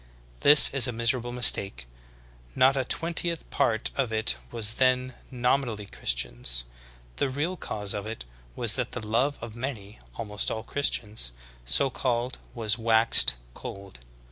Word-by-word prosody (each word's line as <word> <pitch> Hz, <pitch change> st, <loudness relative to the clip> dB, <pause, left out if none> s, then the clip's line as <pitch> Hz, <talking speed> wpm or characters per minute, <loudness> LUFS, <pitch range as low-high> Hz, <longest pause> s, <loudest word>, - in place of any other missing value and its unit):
This 150 Hz, +1 st, +8 dB
is 135 Hz, -4 st, +4 dB
a -, -, -2 dB
miserable 115 Hz, +1 st, -2 dB
mistake; 100 Hz, -, +4 dB, 0.7 s
not 135 Hz, +1 st, +3 dB
a 135 Hz, -, -1 dB
twen 165 Hz, +6 st, -3 dB
tieth 170 Hz, -1 st, +1 dB
part 115 Hz, -6 st, 0 dB
of 130 Hz, -4 st, -2 dB
it 110 Hz, +1 st, 0 dB, 0.2 s
was 115 Hz, -2 st, +2 dB
then 130 Hz, 0 st, +1 dB, 0.2 s
nominally 125 Hz, -4 st, -1 dB
Christians. -, -, -2 dB, 0.5 s
The 140 Hz, -, -1 dB
real 150 Hz, +7 st, -3 dB
cause 105 Hz, -, -4 dB
of 105 Hz, 0 st, -6 dB
it 110 Hz, -, -8 dB, 0.3 s
was 115 Hz, -2 st, +1 dB
that 125 Hz, -2 st, -3 dB
the 115 Hz, -4 st, -6 dB
love 130 Hz, +6 st, 0 dB
of 115 Hz, -1 st, -9 dB
many, 115 Hz, -5 st, -7 dB, 0.2 s
almost 105 Hz, -3 st, -3 dB
all 110 Hz, -, -5 dB
Christians, 105 Hz, -, -1 dB, 0.3 s
so 135 Hz, -, +4 dB
called, 125 Hz, -1 st, -3 dB, 0.2 s
was 110 Hz, -1 st, -2 dB
waxed 110 Hz, -, +4 dB, 0.2 s
cold. 100 Hz, -3 st, -10 dB
115 Hz, 145 wpm, -26 LUFS, 105-130 Hz, 0.7 s, This